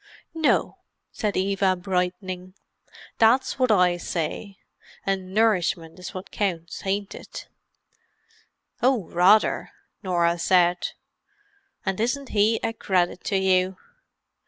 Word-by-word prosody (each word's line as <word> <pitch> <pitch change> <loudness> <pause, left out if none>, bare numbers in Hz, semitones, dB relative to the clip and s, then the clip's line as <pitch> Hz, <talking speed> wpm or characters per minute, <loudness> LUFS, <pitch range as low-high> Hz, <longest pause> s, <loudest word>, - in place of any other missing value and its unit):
"No," 320 -2 +1 0.3
said 210 -3 -2
Eva 195 0 +2
brightening. 180 0 -3 0.6
"That's 235 +5 +3
wot 255 -1 +3
I 180 -4 +4
says. 175 +4 -4 0.5
An' 190 -1 -2
nourishment 185 -6 +1
is 180 - -7
wot 185 +1 -8
counts, 175 -3 -3
ain't 200 +1 -1
it?" - - -9 1.3
"Oh, 250 -4 +3
rather!" 185 +5 +4 0.3
Norah 175 -3 +1
said. 175 0 +2 0.9
"And 195 0 -1
isn't 245 +4 -1
he 215 +2 +2
a 225 0 -1
credit 180 -5 0
to 200 - +1
you! 185 0 +2
190 Hz, 110 wpm, -24 LUFS, 180-210 Hz, 1.3 s, I